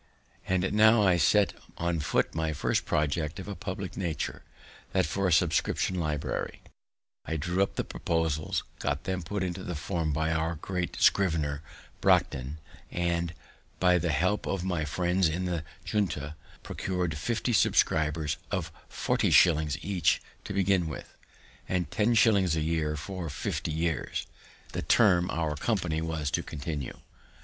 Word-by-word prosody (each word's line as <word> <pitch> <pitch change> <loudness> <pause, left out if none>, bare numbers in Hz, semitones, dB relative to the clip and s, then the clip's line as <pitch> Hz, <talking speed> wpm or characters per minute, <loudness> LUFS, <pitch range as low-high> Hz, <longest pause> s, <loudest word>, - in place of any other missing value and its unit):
And 95 +1 +1
now 110 +1 +6
I 90 -2 +4
set 75 - +4 0.2
on 85 -1 0
foot 70 - +1
my 80 -1 -1
first - - 0
project 75 +3 0
of 95 - -7
a 100 - -3
public 95 0 -5
nature, 85 -5 -3 0.5
that - - +3
for 95 +5 0
a - - +1
subscription 85 +2 +2
library. 75 -3 -2 0.6
I 80 - -2
drew 90 +5 0
up 100 - +1
the - - 0
proposals, 80 -2 -1 0.2
got - - -1
them 95 -1 -2
put 95 +4 -3
into 90 0 -3
form 80 0 -1
by 80 +2 0
our 80 +1 0
great 90 +2 -3
scrivener, 80 -6 +3 0.4
Brockden, 65 +3 +2 0.3
and, 85 -1 -1 0.4
by 90 -1 +4
the 85 +1 -1
help 90 +7 +1
of 95 -2 -1
my 90 -5 -1
friends 90 +2 +1
in 90 +4 -2
the 85 -3 -2 0.2
Junto, 80 -8 -1 0.3
procured 90 -3 -2
fifty 115 +8 -1
subscribers 75 -6 +2
of - - -2 0.2
forty - - +1
shillings 75 -5 +5
each 95 -3 +2 0.3
to - - -4
begin 95 -3 +2
with, 75 - -8 0.5
and 90 -4 -1
ten 115 +2 +2
shillings 100 -8 +4
a 80 - 0
year 80 -1 0
for 85 +3 -5
fifty 75 - -3
years, 80 -1 -1 0.5
the - - -3
term 90 +1 +4
our 80 -2 -1
company 85 -2 0
was 80 -3 -2
to - - +1
continue. 75 -2 -5
85 Hz, 150 wpm, -29 LUFS, 80-95 Hz, 0.6 s, now